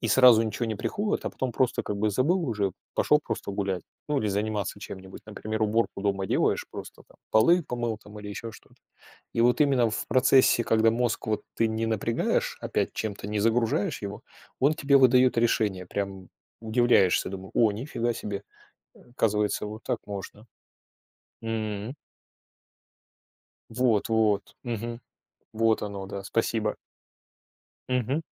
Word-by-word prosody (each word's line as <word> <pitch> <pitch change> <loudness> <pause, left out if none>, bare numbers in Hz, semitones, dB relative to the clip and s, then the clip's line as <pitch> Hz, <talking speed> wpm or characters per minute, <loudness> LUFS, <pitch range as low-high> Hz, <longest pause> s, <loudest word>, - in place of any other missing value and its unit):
и 115 - -1
сразу 120 0 +7
ничего 110 +2 -2
не 110 - -2
приходит, 205 - -2
а - - -2
потом 130 - -3
просто 125 +1 0
как 105 - -3
бы 105 +1 +1
забыл 160 - +2
уже, 100 -5 -1 0.2
пошел - - +3
просто - - -4
гулять, 95 -3 -2 0.3
ну, 150 - +1
или 110 - 0
заниматься 105 0 -2
чем-нибудь. 95 -1 -9
Например, 110 +1 -4
уборку 110 -2 0
дома 100 -1 0
делаешь, - - +1
просто - - -9
там - - -22
полы 170 +11 +5
помыл 120 -4 -3
там 105 0 -12
или 105 - -8
еще 115 +3 -6
что-то. - - -17 0.6
И - - -1
вот 120 +4 +3
именно 135 -5 +4
в 105 - -3
процессе, 130 -2 +4
когда 110 0 +4
мозг 115 0 -1
вот 110 - 0
ты 115 - +2
не 110 +1 -1
напрягаешь 115 +1 0
опять - - -1
чем-то, 100 -2 -4
не 105 0 -1
загружаешь 110 -1 +1
его, 100 0 -6 0.4
он 145 +4 +3
тебе 140 -3 +3
выдает 125 -1 +5
решение. 105 -5 +1
Прям 95 -1 -4 0.3
удивляешься, 110 -4 +3
думаю: 95 0 -8
"О, 115 -2 +4
ни 105 +5 -5
фига 120 -5 -1
себе. 100 -2 -5 0.5
Оказывается, 105 -4 -1
вот 110 +2 -8
так - - -1
можно." 105 +2 -8 1.0
М. 110 +1 -3 1.7
Вот-вот. 110 -3 +1
Мгм. 120 0 -4 0.5
Вот 110 0 +2
оно, 100 -2 -5
да, 100 0 -6
спасибо. 110 0 0 1.1
Мгм. 130 +4 0
110 Hz, 150 wpm, -27 LUFS, 105-120 Hz, 1.7 s, сразу